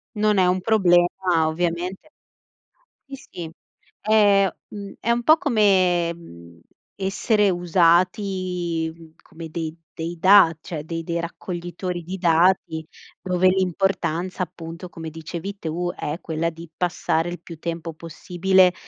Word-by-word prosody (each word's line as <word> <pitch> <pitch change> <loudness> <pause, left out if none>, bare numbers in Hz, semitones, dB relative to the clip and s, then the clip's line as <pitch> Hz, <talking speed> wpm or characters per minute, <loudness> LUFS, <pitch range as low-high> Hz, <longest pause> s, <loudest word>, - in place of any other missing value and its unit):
Non 210 -1 +2
è 185 - +5
un 180 +1 +1
problema 180 -5 +4 0.4
ovviamente 175 - -3 1.0
sì, 275 - -9 0.2
sì, 165 -2 -7 0.5
è, 205 -2 +4 0.2
mhmm, 200 -1 -8
è 235 - -1
un 240 0 +2
po' 315 +5 +6
come, 185 - +3
mhmm, 85 - -14 0.4
essere 200 +2 +1
usati, 175 -1 +1
uhm, 165 -1 -16
come 165 0 -10
dei 160 -1 -4 0.2
dei 165 +2 -4
dati 185 -3 +6
cioè 155 -3 -6
dei 165 0 -4
dei 170 +1 -3
raccoglitori 175 +1 -5
di 185 +3 -6
dati, 165 -2 +2 0.3
dove 185 0 +2
l'importanza, 185 -1 0
appunto, 170 +1 -9
come 165 -2 -8
dicevi 165 +5 -7
tu 175 +1 -3
è 150 +4 -4
quella 165 0 -2
di 165 0 -12
passare 175 -1 0
il 175 - -7
più 165 -1 -11
tempo 165 0 -5
possibile, 180 +3 +2
175 Hz, 130 wpm, -23 LUFS, 165-190 Hz, 1.0 s, po